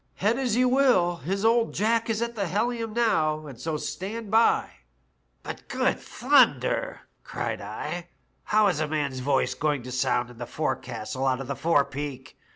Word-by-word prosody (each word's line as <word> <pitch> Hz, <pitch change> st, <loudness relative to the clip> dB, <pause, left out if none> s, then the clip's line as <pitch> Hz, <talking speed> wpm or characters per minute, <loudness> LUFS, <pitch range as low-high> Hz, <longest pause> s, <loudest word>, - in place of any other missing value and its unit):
Head 220 Hz, +6 st, +1 dB
as 250 Hz, -5 st, 0 dB
you 250 Hz, +1 st, +4 dB
wiU, 245 Hz, -, +3 dB
His 195 Hz, +8 st, -2 dB
old 230 Hz, 0 st, +3 dB
Jack 230 Hz, +2 st, +1 dB
as 225 Hz, -, +1 dB
is 215 Hz, -, -3 dB
at 235 Hz, 0 st, -4 dB
the 200 Hz, -4 st, -1 dB
helium 225 Hz, +4 st, -1 dB
now, 160 Hz, -10 st, +1 dB
and 135 Hz, -5 st, -10 dB
so 160 Hz, -2 st, -2 dB
stand 205 Hz, +7 st, -5 dB
by/" 225 Hz, +1 st, +4 dB, 0.4 s
* 65 Hz, -1 st, -44 dB
"'But, -, -, -8 dB
good -, -, 0 dB
thunder!* -, -, +2 dB, 0.2 s
cried -, -, -4 dB
I, 150 Hz, +12 st, -5 dB, 0.4 s
*how 215 Hz, 0 st, +3 dB
is 185 Hz, -6 st, +2 dB
a 155 Hz, -, 0 dB
man's 145 Hz, -4 st, -2 dB
voice 135 Hz, +1 st, +1 dB
going 145 Hz, -4 st, -1 dB
to 125 Hz, -, -8 dB
sound 125 Hz, -1 st, 0 dB
in 120 Hz, -, -15 dB
the 120 Hz, -, -5 dB
forecastle 125 Hz, -3 st, -3 dB
out 130 Hz, -1 st, +1 dB
of 135 Hz, -, -5 dB
the 140 Hz, +2 st, -4 dB
forepeak? 145 Hz, -3 st, -1 dB
160 Hz, 180 wpm, -26 LUFS, 135-225 Hz, 0.4 s, you